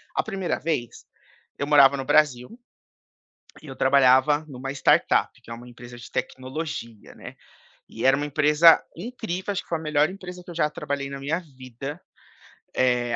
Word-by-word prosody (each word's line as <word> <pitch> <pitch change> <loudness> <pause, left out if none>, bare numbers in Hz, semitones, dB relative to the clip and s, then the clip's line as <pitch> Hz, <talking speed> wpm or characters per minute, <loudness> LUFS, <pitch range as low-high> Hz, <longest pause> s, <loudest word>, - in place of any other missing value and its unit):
A - - +1
1ª 195 -4 -3
vez, 150 -8 -3 0.6
eu 140 - -2
morava 140 -2 +6
no 135 - -5
Brasil 145 -4 +2 1.1
e - - -13
eu 135 - -8
trabalhava 135 +3 +4
em 140 - -11
uma 130 +2 -6
startup, 140 - +2
que - - -15
é - - -5
uma 120 +1 -12
empresa 120 0 -12
de 120 - -11
tecnologia, 130 -4 -6
né, - - -10 0.5
e 115 - -7
era 135 +1 +5
uma 145 +1 -2
empresa 150 +3 +5
incrível, 205 -1 -5
acho 195 - -3
que - - -29
foi 165 - -1
a - - -10
melhor 150 0 +1
empresa 180 -2 -9
que - - -11
eu - - -9
já 155 -2 +1
trabalhei 140 -2 -4
na 140 0 -7
minha 155 +5 -2 0.2
vida. 130 +5 -8 0.8
Eh, 125 -2 +1
140 Hz, 180 wpm, -24 LUFS, 130-160 Hz, 1.1 s, morava